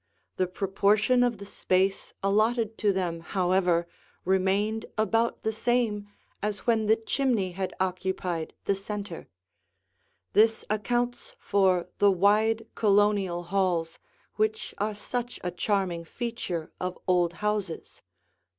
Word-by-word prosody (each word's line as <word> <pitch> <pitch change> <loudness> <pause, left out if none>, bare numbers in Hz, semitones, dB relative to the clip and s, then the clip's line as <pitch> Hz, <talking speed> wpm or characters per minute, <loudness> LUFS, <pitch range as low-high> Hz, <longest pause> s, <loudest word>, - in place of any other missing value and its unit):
The 185 - +1
proportion 205 +6 +2
of 245 -2 +2
the 200 - -9
space 190 -1 0
allotted 220 +3 +2
to 210 -2 +3
them, 180 -3 -2
however, 180 -1 +1 0.4
remained 195 +4 +1
about 225 +2 +1
the 220 - +1
same 220 -2 0 0.3
as 210 -1 -3
when 225 -3 +2
the 220 - +6
chimney 225 -4 0
had 185 +1 -4
occupied 185 -3 -2
the 200 - +2
center. 200 -2 -6 1.1
This 220 +1 +4
accounts 245 - -1
for 185 -3 +2
the 205 - +6
wide 210 +4 +3
Colonial 200 -4 +2
halls, 175 -3 0 0.4
which 215 0 -1
are 210 +1 -1
such 245 +3 -4
a 180 - -2
charming 180 -2 -1
feature 185 -5 -4
of 185 0 -3
old 175 -2 +3
houses. 205 -2 -3
200 Hz, 120 wpm, -27 LUFS, 185-220 Hz, 1.1 s, the